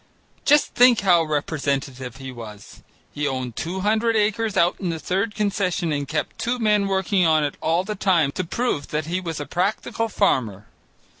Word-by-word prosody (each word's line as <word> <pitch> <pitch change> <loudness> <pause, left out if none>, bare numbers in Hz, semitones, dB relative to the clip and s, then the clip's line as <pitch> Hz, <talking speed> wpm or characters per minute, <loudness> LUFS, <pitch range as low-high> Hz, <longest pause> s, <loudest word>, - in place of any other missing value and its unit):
Just 295 +1 +4
think 245 -2 +5
how 180 -4 +4
representative 140 -5 -2
he 135 -1 -7
was. 110 -4 -11 0.3
He 145 0 -1
owned 130 -3 -3
two 180 +4 -4
hundred 220 +3 +1
acres 215 0 0
out 175 0 +3
on 185 - -1
the 165 - -2
Third 195 +6 -2
Concession 195 -5 -1
and 145 -1 -2
kept 150 +2 -3
two 245 +2 -1
men 210 -3 +2
working 190 0 +1
on 155 -2 +3
it 145 - -1
all 165 +3 +1
the 210 +2 -4
time 180 -8 +2
to 185 - -3
prove 180 - -2
that 150 0 -2
he 175 +3 -2
was 165 -4 -5
a 145 - -4
practical 210 +6 -1
farmer. 115 - 0
175 Hz, 180 wpm, -23 LUFS, 145-205 Hz, 0.3 s, think